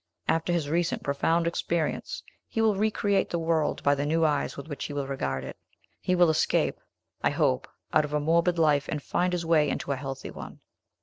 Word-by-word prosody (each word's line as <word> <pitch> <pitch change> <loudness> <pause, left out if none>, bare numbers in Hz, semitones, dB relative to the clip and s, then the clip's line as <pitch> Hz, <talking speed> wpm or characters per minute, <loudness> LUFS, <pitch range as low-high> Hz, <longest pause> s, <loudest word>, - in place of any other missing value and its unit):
After 165 +2 +1
his 170 -4 0
recent 170 +3 0
profound 165 +4 +1
experience, 170 - -2 0.2
he - - -4
will 220 -1 +4
re 215 +3 +2
create 200 -2 +1
the 170 - -1
world 165 -2 0
by 140 - +4
the 140 0 -1
new 160 +2 +2
eyes 150 -2 0
with 140 - -7
which 145 -3 -5
he 145 - -5
will 140 -1 -2
regard 70 - -2
it. 65 - -8 0.4
He 180 - +1
will 175 -2 +5
escape, 155 - +1 0.4
I - - +3
hope, 65 - +1 0.3
out 155 - +5
of 150 - -8
a - - +2
morbid 170 +3 +2
life, 150 -3 +3
and 150 - -1
find 180 +1 0
his 175 -2 -2
way 155 -3 +3
into 140 - -2
a - - +1
healthy 135 0 -6
one." - - -10
160 Hz, 210 wpm, -27 LUFS, 145-170 Hz, 0.4 s, will